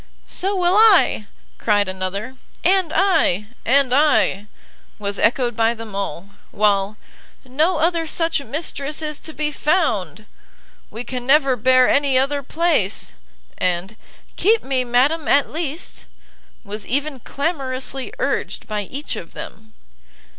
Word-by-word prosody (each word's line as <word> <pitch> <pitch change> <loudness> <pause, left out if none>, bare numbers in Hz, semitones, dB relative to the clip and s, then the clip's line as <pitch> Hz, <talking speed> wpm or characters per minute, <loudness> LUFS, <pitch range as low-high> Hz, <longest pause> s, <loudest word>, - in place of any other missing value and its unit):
"So 390 +2 -2
will 365 +1 +2
I!" 415 - +5 0.3
cried 205 -2 +2
another, 190 +6 -4 0.3
"And 370 -2 +3
I!" 325 - +2 0.2
"And 260 0 +3
I!" 265 -8 +3 0.5
was 200 -1 -3
echoed 240 0 +2
by 230 +1 +2
them 225 -2 -9
all; 195 -1 -5 0.2
while 205 0 +1 0.5
"no 310 +8 +1
other 330 +1 +1
such 330 -1 0
mistress 295 +2 -4
is 300 -1 -4
to 315 - -7
be 300 -1 -2
found!" 235 - 0 0.6
"We 230 +3 -6
can 250 0 -6
never 275 -2 +4
bear 255 +2 +4
any 280 -2 +3
other 280 +2 +1
place!" 310 - 0 0.5
and 185 +4 -1 0.4
"keep 445 +3 +3
me, 260 -1 0
madam, 265 +6 +1
at 280 -1 +3
least!" 320 +1 -5 0.6
was 210 0 -5
even 280 +1 -2
clamorously 270 -2 -3
urged - - -2
by 210 -2 -2
each 280 +8 -5
of - - -9
them. 220 0 -9
265 Hz, 130 wpm, -20 LUFS, 215-310 Hz, 0.6 s, I